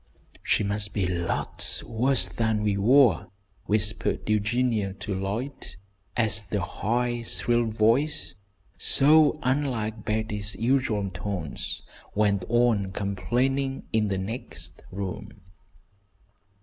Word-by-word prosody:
"She - - +1
must 100 0 -1
be 100 -3 +1
lots 85 -1 -3
worse 125 +4 +1
than 110 -2 -1
we 105 -1 +1
were," 115 - +4 0.4
whispered 105 0 -1
Eugenia 110 -1 +1
to 100 +1 -5
Lloyd, 100 +9 -4 0.4
as 110 -3 +4
the 105 0 -3
high, 120 +6 -1
shrill 120 +1 +1
voice, 115 - +1 0.5
so 155 +2 +6
unlike 125 -5 -1
Betty's 105 -1 0
usual 115 -5 0
tones, 90 -4 -4 0.3
went 100 -3 +2
on 115 -5 +2
complainingly 120 +9 -1
in 110 -1 +2
the 100 -1 -1
next 85 -5 -6
room. 95 -1 -6
110 Hz, 105 wpm, -26 LUFS, 100-120 Hz, 0.5 s, so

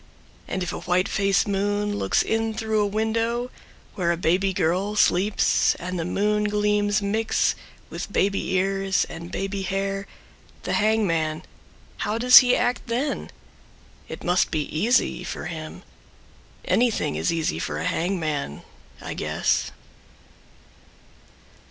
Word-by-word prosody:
And 190 - -2
if 180 - -4
a - - -4
white 180 +1 +1
face 195 0 +1
moon 205 +1 -1
looks - - +1
In 225 0 -1
through 220 -1 -1
a 205 - +2
window 225 +3 -1 0.4
where 175 -4 0
a 170 - -1
baby 180 +3 +1
girl 185 +4 0
Sleeps 200 0 +3
and 180 0 -5
the 165 - -2
moon 210 +3 0
gleams 210 0 +1
mix 220 +2 +1 0.4
with - - -6
Baby 195 -1 0
ears 195 0 +1
and 170 +2 -8
baby 195 0 -3
hair 195 +1 -2 0.6
the - - -2
hangman 165 -8 +1 0.5
How 210 +2 -2
does 250 +1 +9
he 250 -1 +3
act 245 +1 -1
then? 250 +5 -2 0.8
It - - -8
must 180 +1 +2
be 155 -2 -1
easy 235 +10 +1
For - - -6
him. - - -7 0.8
Anything 240 - +1
is 80 +1 0
easy 160 - -1
for - - -3
a - - -3
hangman, 155 - -2 0.4
I - - -5
guess. - - 0
200 Hz, 135 wpm, -24 LUFS, 180-215 Hz, 0.8 s, does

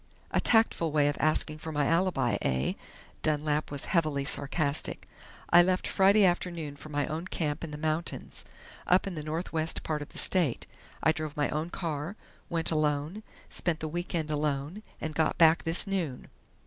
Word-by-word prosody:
"A - - +2
tactful 220 -8 +3
way 145 -1 +3
of 145 - -3
asking 155 0 +1
for 160 +1 -6
my 145 -1 +1
alibi, 165 -7 +2
eh?" 65 0 0 0.5
Dunlap 150 0 0
was 145 -1 -4
heavily 155 -5 +1
sarcastic. 145 +1 -1 0.4
"I 175 - +9
left 185 +1 +1
Friday 195 +2 +5
afternoon 170 -4 -1
for 155 - -11
my 145 -1 0
own 160 +4 -4
camp 150 -4 -2
in 165 - -4
the 150 - -6
mountains, 155 +2 -3 0.4
up 180 +1 +4
in 195 - -4
the 155 - -5
northwest 160 +1 -2
part 155 -2 -2
of 145 - -7
the - - -12
state. 170 -10 +2 0.4
I 160 - +5
drove 155 -2 -5
my 145 - +1
own 155 +3 -2
car, 165 +1 -4 0.3
went 165 -1 -1
alone, 155 +5 0 0.3
spent 170 -3 0
the 155 - -3
week 175 +3 -4
end 155 -2 -1
alone, 150 +5 -2 0.2
and 155 - -4
got 160 0 +1
back 165 0 +5
this 165 +2 +3
noon. 180 -10 -3
155 Hz, 175 wpm, -29 LUFS, 150-175 Hz, 0.5 s, I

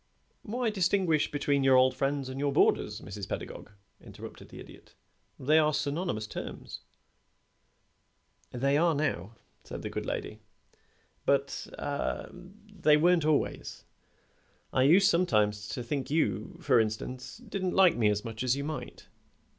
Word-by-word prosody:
"Why 235 +1 -2
distinguish 180 -5 +2
between 140 -1 0
your 135 -1 +5
old 130 0 +5
friends 140 0 -1
and 130 +1 -6
your 145 0 +1
boarders, - - +2
Mrs. 100 -1 -7
Pedagog?" - - -6 0.3
interrupted - - -11
the - - -11
Idiot. - - -14 0.4
"They 155 +4 +4
are 150 -1 +2
synonymous 145 - -2
terms." - - -7 1.7
"They 140 +3 +1
are 165 0 +3
now," 115 - -2 0.3
said - - -8
the - - -4
good - - -4
lady, - - -4 0.8
"but 140 0 0
ah 145 0 -3
they 185 -3 0
weren't 170 0 +3
always. 155 -2 -1 0.9
I 130 - +3
used 190 +4 +6
sometimes 105 - +2
to 125 - -4
think 135 +3 -3
you, 165 +3 -1
for 135 - +4
instance, 115 - -3
didn't 200 -6 -3
like 190 -3 +6
me 110 -3 +3
as 105 0 -1
much 110 -1 -6
as 125 0 +2
you 140 - -3
might." 155 +1 -6
145 Hz, 140 wpm, -29 LUFS, 130-175 Hz, 1.7 s, used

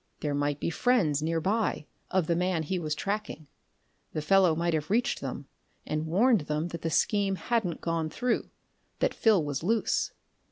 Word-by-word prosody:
There 145 -1 -1
might 145 0 0
be - - -1
friends, 170 - +2
nearby, 165 +4 0 0.2
of 185 -3 +1
the 170 - +1
man 180 -1 0
he 180 +4 -2
was 155 -2 -2
tracking. 200 -3 -3 0.7
The 155 - -2
fellow 185 -1 +4
might 170 +1 0
have 155 -1 -1
reached 230 +5 +1
them, - - -5 0.4
and 155 +1 -2
warned 215 +5 +4
them 150 +3 -1
that 170 -1 -6
the 165 - -1
scheme 200 +4 +2
hadn't 210 -5 -1
gone 165 -1 -1
through, 245 +7 -1 0.5
that - - +1
Phil 215 -7 +3
was 145 -1 -3
loose. 220 +6 +1
170 Hz, 170 wpm, -28 LUFS, 155-205 Hz, 0.7 s, fellow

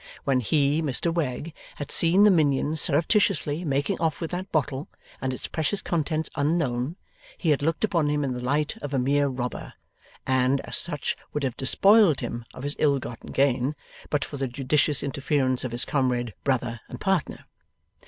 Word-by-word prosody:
When 135 -2 +2
he, 145 +4 +1
Mr 155 +3 0
Wegg, 155 -1 -3 0.2
had 145 - -7
seen 175 +4 +5
the 210 - +7
minion 150 -3 +2
surreptitiously 160 0 +2
making 145 0 -1
off 160 -2 0
with 165 - -4
that 185 +2 -5
bottle, 145 -2 -1 0.3
and 130 - -1
its 130 - -5
precious 160 +5 -1
contents 160 -1 -1
unknown, 145 -2 0 0.4
he 165 - +1
had 145 - +1
looked 165 +6 -1
upon 170 -8 +1
him 150 0 0
in 135 -2 -1
the 125 0 -6
light 145 +4 0
of 145 -1 -5
a - - +2
mere 140 +3 +2
robber, 125 -2 -5 0.5
and, 130 +1 +2
as - - +1
such, 150 -5 -2 0.2
would 150 - -2
have 130 -3 -1
despoiled 195 - +5
him 120 0 -5
of 130 - -10
his 145 +1 +1
ill 145 -2 +3
gotten 120 -3 -8
gain, 135 +1 +1 0.3
but 145 -2 0
for 145 - -8
the 135 0 -2
judicious 140 +3 0
interference 135 -2 0
of 130 - -4
his 120 +1 +3
comrade, 125 -5 0
brother, 120 -4 -1
and - - -8
partner. 190 -5 -1
145 Hz, 180 wpm, -25 LUFS, 130-160 Hz, 0.5 s, the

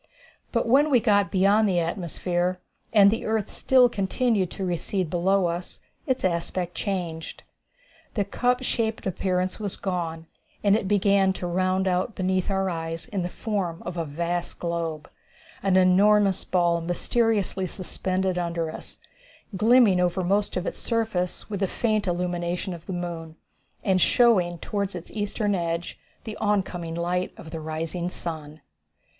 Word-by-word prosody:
But 235 -1 0
when 280 +6 +5
we 255 -4 +5
got 205 -3 +3
beyond 200 +2 +4
the 180 - +1
atmosphere, 175 +1 -1 0.3
and 200 -2 +7
the 225 - -2
earth 220 -2 -1
still 255 -2 +4
continued 205 -2 0
to 195 - -4
recede 180 0 -2
below 190 +2 +2
us, 175 +1 -4 0.3
its 260 -5 0
aspect 175 0 -1
changed. 175 -6 -4 0.7
The 205 -3 +1
cup 250 +5 0
shaped 225 -3 -1
appearance 185 0 -1
was 205 -3 -3
gone, 165 -4 -3 0.4
and 200 -1 +5
it 210 -3 -1
began 200 -1 +3
to 185 - -5
round 185 +2 +1
out 185 +4 0
beneath 185 0 0
our 195 -1 +1
eyes 165 -2 -4
in 200 -3 -2
the 175 - -2
form 185 -5 -3
of 175 - -4
a 170 - -1
vast 170 +3 -3
globe 165 -3 -3 0.5
an 190 -1 +3
enormous 195 +1 +4
ball 170 -2 +2
mysteriously 195 +2 0
suspended 185 0 -2
under 170 -2 -2
us, - - -9 0.6
glimmering 220 -2 +5
over 180 +1 +1
most 200 +3 +1
of 180 - -2
its - - -4
surface, 220 -6 -1
with 205 -3 -4
the 195 - +1
faint 215 0 0
illumination 175 +1 -2
of 170 -1 -11
the - - -4
moon, 170 -3 -5 0.5
and 185 -2 +2
showing 185 -8 +4
toward 200 +2 -3
its 175 - -8
eastern 205 0 -1
edge 170 -2 -2 0.2
the 220 -2 -6
oncoming 185 -5 -1
light 180 +2 -1
of 160 - -10
the 165 - -4
rising 160 +3 -3
sun. 155 -3 -6
185 Hz, 150 wpm, -25 LUFS, 175-205 Hz, 0.7 s, and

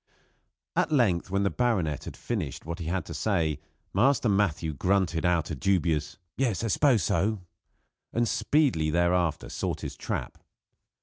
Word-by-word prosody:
At - - +1
length, 105 - +2
when 100 +1 +1
the 100 - +1
baronet 95 - 0
had - - -8
finished - - -4
what 85 +1 -5
he 85 - -5
had 90 +1 -1
to 85 - -7
say, 80 -4 0 0.3
Master 125 +5 +3
Matthew 90 -6 +1
grunted 90 +2 +1
out 85 -3 +1
a - - -2
dubious 80 -2 0 0.2
"Yes 120 -6 0
I 115 - 0
s'pose 120 - +3
so" 95 +6 0 0.7
and 120 0 +1
speedily 130 - +2
thereafter 85 0 +1
sought - - -3
his - - -5
trap. - - -4
90 Hz, 150 wpm, -27 LUFS, 80-110 Hz, 0.7 s, Master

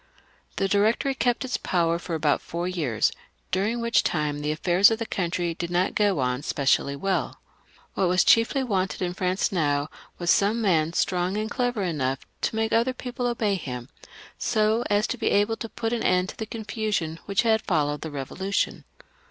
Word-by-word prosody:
The 195 - +1
Directory 215 +7 +2
kept 245 0 0
its 260 - -1
power 170 -2 0
for 175 -1 -4
about 150 -2 +1
four 170 +1 -4
years, 150 - 0 0.4
dur 190 +1 +1
ing 235 +1 -2
which 235 0 +3
time 150 -3 -1
the 150 +1 -1
affairs 175 +5 +4
of 225 - 0
the 230 - -3
country 175 -3 -1
did 170 +1 -4
not 175 +1 +1
go 205 -3 +2
on 125 0 0
specially 140 -1 +1
well. 190 +7 -2 0.5
What 190 - +1
was 180 +1 +4
chiefly 230 +4 +4
wanted 190 -6 -1
in 175 0 -1
France 185 +1 0
now 145 -5 0 0.3
was 175 -1 +1
some 205 +4 +3
man, 165 -7 +2
strong 180 +2 0
and 215 0 -2
clever 245 -5 -1
enough 135 -7 -2 0.2
to - - -1
make 220 0 0
other 235 +3 +2
people 250 0 -4
obey 225 -4 0
him, 125 -8 -5 0.5
so 220 +1 +2
as 205 +1 +2
to 250 - -3
be 230 - -1
able 205 +2 +2
to 230 - -6
put 225 +1 -3
an 235 - -1
end 185 +1 +2
to - - -7
the 220 - -5
con 225 -1 -6
fusion 205 -8 -2
which 200 +3 +2
had 220 -1 +3
followed 145 0 0
the 160 - -5
Eevolution. 155 +8 -2
190 Hz, 195 wpm, -25 LUFS, 165-220 Hz, 0.5 s, affairs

